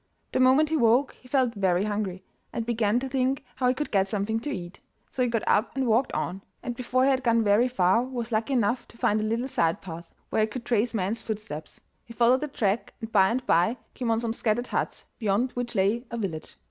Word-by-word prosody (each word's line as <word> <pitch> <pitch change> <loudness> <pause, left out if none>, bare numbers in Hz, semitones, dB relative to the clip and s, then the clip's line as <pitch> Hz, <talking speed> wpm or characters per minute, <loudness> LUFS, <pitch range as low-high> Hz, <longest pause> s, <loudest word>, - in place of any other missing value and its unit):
The - - 0
moment 265 +4 +5
he 320 - +1
woke 245 +2 +3
he 255 - -16
felt 255 -2 +2
very 190 -3 +1
hungry, 205 -3 -3 0.3
and 230 - -3
began 230 -1 +1
to 270 - -3
think 265 0 0
how 255 -1 +1
he 250 - +3
could 295 +3 -3
get 195 -1 +2
something 210 +2 -1
to 245 - -5
eat. 175 -9 -6 0.3
So 260 - -3
he 250 - +2
got 230 -2 -1
up 215 +5 +2
and 270 -1 0
walked 235 +3 +2
on, 190 +2 -2 0.2
and 245 - -4
before 255 +1 0
he 275 - +4
had 260 -1 +1
gone 230 -2 +3
very 210 +4 +4
far 195 -2 +3
was 245 -2 -4
lucky 220 +4 0
enough 240 0 +1
to - - -18
find 215 -1 +2
a - - -1
little 230 +4 -1
side 165 -10 +1
path, 170 -2 -9 0.2
where - - +2
he 215 - +3
could 235 +2 -7
trace 235 0 +1
men's 210 +3 -1
footsteps. 210 -9 -6 0.2
He 230 - -12
followed 245 +3 +4
the 300 - -2
track, 220 -5 -1
and 225 -1 -7
by 190 -3 +5
and 250 +2 -1
by 175 +9 +3 0.2
came 245 -3 -3
on 225 0 +2
some 230 -1 -2
scattered 235 +1 0
huts, - - -3
beyond 220 +3 +1
which 245 -1 -4
lay 205 +5 +2
a 235 - -4
village. 180 -8 -4
230 Hz, 235 wpm, -26 LUFS, 205-250 Hz, 0.3 s, moment